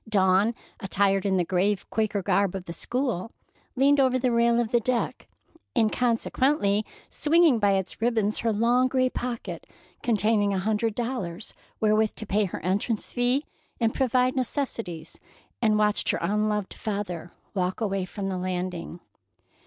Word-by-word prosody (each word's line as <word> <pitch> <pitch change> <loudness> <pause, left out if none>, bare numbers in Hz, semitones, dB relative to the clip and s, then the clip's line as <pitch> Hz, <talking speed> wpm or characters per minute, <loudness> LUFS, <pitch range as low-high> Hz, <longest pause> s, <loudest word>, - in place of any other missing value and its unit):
Dawn, 195 +2 +3 0.2
attired 195 -1 +1
in 190 - +2
the 180 -2 +1
grave 190 +3 0
Quaker 215 -3 0
garb 195 0 +1
of 190 -2 -5
the 170 - -6
school, 235 - -2 0.4
leaned 280 +2 +4
over 260 -1 +3
the 255 -1 +1
rail 235 0 +3
of 235 -2 -1
the 240 - +4
deck, 240 +1 -2 0.5
inconsequently 230 -1 +2 0.3
swinging 315 -5 +4
by 205 -2 +3
its 190 +2 -3
ribbons 220 -3 +1
her 230 - +1
long 240 +4 +3
gray 255 -1 +1
pocket 240 -1 -5 0.3
containing 210 -2 +2
a - - 0
hundred 215 +3 0
dollars 230 -7 -4 0.3
wherewith 215 0 +2
to 215 - -7
pay 205 +1 +1
her 180 - -6
entrance 205 +4 -1
fee 245 +4 +1 0.3
and 230 -1 +1
provide 255 -1 +2
necessities, 230 - -3 0.4
and 215 -2 +3
watched 210 0 +1
her - - +2
unloved 210 -1 0
father 190 -5 -4 0.2
walk 185 -2 -1
away 195 -4 -1
from 195 +2 -5
the 190 -1 -2
landing. 180 -2 -4
215 Hz, 150 wpm, -26 LUFS, 195-240 Hz, 0.5 s, leaned